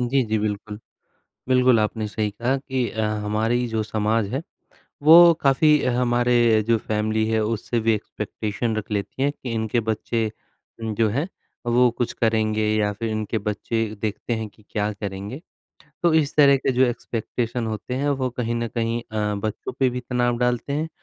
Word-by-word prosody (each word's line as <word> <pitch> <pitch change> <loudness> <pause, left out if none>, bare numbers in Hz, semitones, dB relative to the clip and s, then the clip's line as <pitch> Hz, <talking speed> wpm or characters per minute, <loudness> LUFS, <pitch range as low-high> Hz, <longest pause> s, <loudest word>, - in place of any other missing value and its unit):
जी, 125 +2 +2
जी, 110 0 0
बिल्कुल। 105 0 -3 0.7
बिल्कुल 125 -2 +5
आपने 110 0 -1
सही 105 0 -2
कहा 120 +6 -1
कि 130 -3 -2
अ, 110 - -4 0.2
हमारी 110 +4 0
जो 110 -1 -1
समाज 110 0 0
है, 140 - -1 0.6
वो 170 +2 +9
काफ़ी 150 +2 +4
हमारे 120 -2 +3
जो 115 - +5
फैमिली 110 +1 -1
है 110 0 +1
उससे 115 +1 -1
भी 115 0 +2
एक्सपेक्टेशन 110 +2 -3
रख 110 0 -5
लेती 105 +5 -3
हैं 140 - +3
कि 130 - -8
इनके 110 +1 0
बच्चे, 110 0 -1 0.5
जो 110 0 +1
हैं 140 - -1 0.4
वो 120 +1 +4
कुछ 120 - 0
करेंगे 110 -1 +1
या 105 -1 +1
फिर 110 +2 -4
इनके 110 +1 -2
बच्चे 105 +2 -2 0.2
देखते 110 +2 -3
हैं 110 -1 -4
कि 105 - -23
क्या 105 0 -1
करेंगे। 100 +6 -6 0.6
तो 170 -2 +4
इस 155 -2 +2
तरह 140 -2 +7
के 135 - 0
जो 130 +1 +3
एक्सपेक्टेशन 120 0 -3
होते 110 +3 -4
हैं 140 +2 -1
वो 130 - 0
कहीं 120 -1 -2
न 115 0 -2
कहीं 115 0 -1
अ, 105 -2 -2
बच्चों 105 +1 -4
पे 130 -2 +3
भी 125 - -4
तनाव 120 -1 0
डालते 125 +2 0
हैं 155 +3 -1
115 Hz, 175 wpm, -23 LUFS, 110-125 Hz, 0.7 s, वो